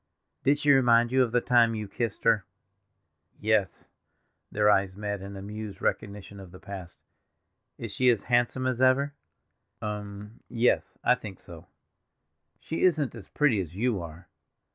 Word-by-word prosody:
"Did 140 +2 +3
she 145 0 +3
remind 120 -3 +4
you 130 0 +4
of 120 -3 +1
the 125 0 +2
time 120 -2 +4
you 105 -1 -4
kissed 115 0 -4
her?" 105 - +3 1.0
"Yes!" 105 -2 0 0.6
Their 105 0 +2
eyes 95 -2 +3
met 105 -1 -3
in 100 +1 -8
amused 105 +1 -7
recognition 100 -1 -3
of 95 -2 -11
the 90 +1 -13
past. 95 -3 -9 0.8
"Is 115 -3 -6
she 125 +5 +3
as 115 -5 +2
handsome 120 +1 +1
as 130 -1 -1
ever?" 135 +2 +3 0.7
"Um—yes—I 105 +4 -1
think 110 -6 -7
so. 85 -1 -12 0.9
She 160 - -5
isn't 155 -7 +2
as 115 -5 -11
pretty 140 -9 +2
as 85 -1 -8
you 110 -2 0
are." 85 +1 -10
110 Hz, 145 wpm, -27 LUFS, 100-125 Hz, 1.0 s, remind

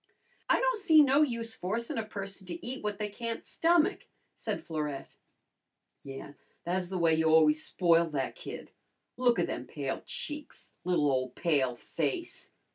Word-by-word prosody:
"I - - +5
don' - - +2
see 320 -7 +6
no 280 +1 +4
use 235 -5 0
forcin' 225 +5 -2
a - - -1
person 195 -3 -6
to 170 -1 -6
eat 255 0 -5
what 210 -1 -2
they 210 0 -2
can't 230 +2 -5
stomach," 335 0 +2 0.3
said - - -3
Florette. 150 -4 -4 0.9
"Yeah, 135 +1 -8 0.3
tha's 180 +1 -1
the 190 - -2
way 165 -2 +4
you've 160 0 +2
always 155 -1 +5
spoiled 170 -2 +3
that 135 -2 -1
kid. - - -8 0.4
Look 245 -1 +3
a' - - +2
them - - -5
pale - - -3
cheeks! 295 -1 -7
Li'l 180 -5 +2
ole 130 -1 0
pale 135 -4 +1
face!" 145 +3 -3
185 Hz, 160 wpm, -30 LUFS, 160-235 Hz, 0.9 s, see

